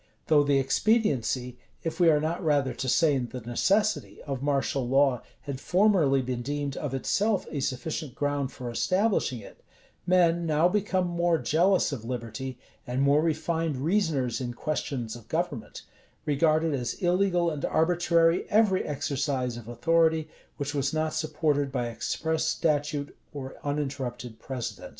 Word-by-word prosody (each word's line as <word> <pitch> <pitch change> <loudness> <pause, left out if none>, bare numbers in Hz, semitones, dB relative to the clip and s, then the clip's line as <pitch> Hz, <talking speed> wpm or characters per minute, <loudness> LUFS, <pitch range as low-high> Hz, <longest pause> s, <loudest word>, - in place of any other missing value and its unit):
[v*] - - -36 0.2
Though 150 -2 +6
the 140 -1 +3
expediency, 135 - +1 0.2
if 165 - -4
we 175 -2 +6
are 150 -2 +4
not 160 +4 -2
rather 145 -4 +2
to 130 - -3
say 155 +1 +4
the 125 +1 -5
necessity, 195 - 0
of 135 -3 -4
martial 140 -2 0
law 135 -1 +3 0.2
had 140 -2 -5
formerly 175 -9 +3
been 125 -1 -3
deemed 145 +1 -3
of 140 -3 -3
itself 200 - +1
a 145 - -2
sufficient 135 +1 -3
ground 145 -2 -1
for 125 -1 -6
establishing 185 - +1
it, - - -14 0.5
men, 175 -2 +3
now 155 +2 +4
become 190 -1 0
more 170 -1 +1
jealous 175 +5 +2
of 130 -6 -5
liberty, 120 +1 -5 0.3
and 125 +2 0
more 140 +2 +4
refined 160 -1 -1
reasoners 145 - 0
in 120 -1 -4
questions 130 -6 -3
of 120 -3 -13
government, - - -3 0.4
regarded 155 +2 +2
as 125 -3 -2
illegal 175 -2 +2
and 150 -2 -5
arbitrary 170 0 +2
every 205 -3 +3
exercise 140 -4 -2
of 120 -2 -9
authority 160 +6 +2 0.3
which 145 0 -3
was 140 -1 0
not 155 0 0
supported 150 -3 0
by 125 -3 -1
express 160 +7 -2
statute 150 -2 0 0.2
or 135 -2 -6
uninterrupted 135 -5 -4
precedent. 130 -3 -5
145 Hz, 150 wpm, -27 LUFS, 130-165 Hz, 0.5 s, Though